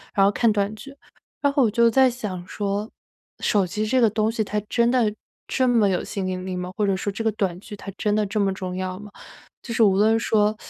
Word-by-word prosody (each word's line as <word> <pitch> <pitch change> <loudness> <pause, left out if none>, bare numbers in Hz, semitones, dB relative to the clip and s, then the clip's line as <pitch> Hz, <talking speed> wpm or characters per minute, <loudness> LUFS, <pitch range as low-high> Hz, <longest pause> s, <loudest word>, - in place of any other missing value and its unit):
然 195 -2 +5
后 200 - +4
看 230 +1 +2
短 205 0 0
剧。 275 +5 -11 0.5
然 285 - +3
后 280 - +3
我 230 - +3
就 235 +2 +4
在 260 +2 +5
想 205 -8 -6
说： 205 +1 -3 0.5
“手 205 -4 +2
机 215 +5 -2
这 255 +3 +2
个 230 - +5
东 215 +1 0
西 225 -1 -1
它 210 +1 -2
真 235 0 +2
的， 230 -5 +2 0.3
这 260 -1 +1
么 230 -4 +4
有 185 - 0
吸 - - -6
引 185 -1 -3
力 185 -1 -4
吗？ 180 0 -4
或 210 - +1
者 195 - +1
说 205 - -2
这 225 +3 -4
个 220 - +2
短 190 -4 -1
剧 205 - -10
它 195 0 -8
真 210 - 0
的 215 -1 +1
这 210 +2 -2
么 200 -1 +2
重 185 -1 -5
要 185 0 -4
吗？” 210 -1 -11 0.5
就 230 - -6
是 225 - +3
无 195 -3 +4
论 220 +2 +4
说 215 -2 +2
210 Hz, 270 characters per minute, -23 LUFS, 195-225 Hz, 0.5 s, 然